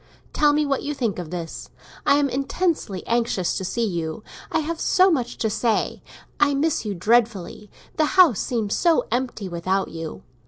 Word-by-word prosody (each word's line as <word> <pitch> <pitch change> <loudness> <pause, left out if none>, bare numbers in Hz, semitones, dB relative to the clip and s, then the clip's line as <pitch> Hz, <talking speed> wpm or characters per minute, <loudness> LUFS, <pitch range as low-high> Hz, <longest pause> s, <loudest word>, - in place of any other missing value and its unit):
Tell 295 -1 +4
me 300 +1 +2
what 275 -2 0
you 295 0 -3
think 230 -9 -1
of 170 -3 -6
this. 170 -1 -6 0.4
I - - +6
am 290 0 +3
intensely 275 - -1
anxious 230 -6 0
to - - -3
see 230 +5 -1
you; 170 -1 -3 0.3
I - - +1
have 325 +2 -4
so 375 +1 +4
much 245 -6 -1
to 220 - 0
say. 220 +1 0 0.4
I 285 -1 +3
miss 305 +3 +1
you 210 -3 -3
dreadfully; 210 -1 +1 0.3
the 310 - +4
house 330 - +7
seems 220 -5 -1
so 335 -2 +3
empty 240 -4 -2
without 185 +2 -1
you. 165 -1 -7
235 Hz, 180 wpm, -23 LUFS, 190-290 Hz, 0.4 s, house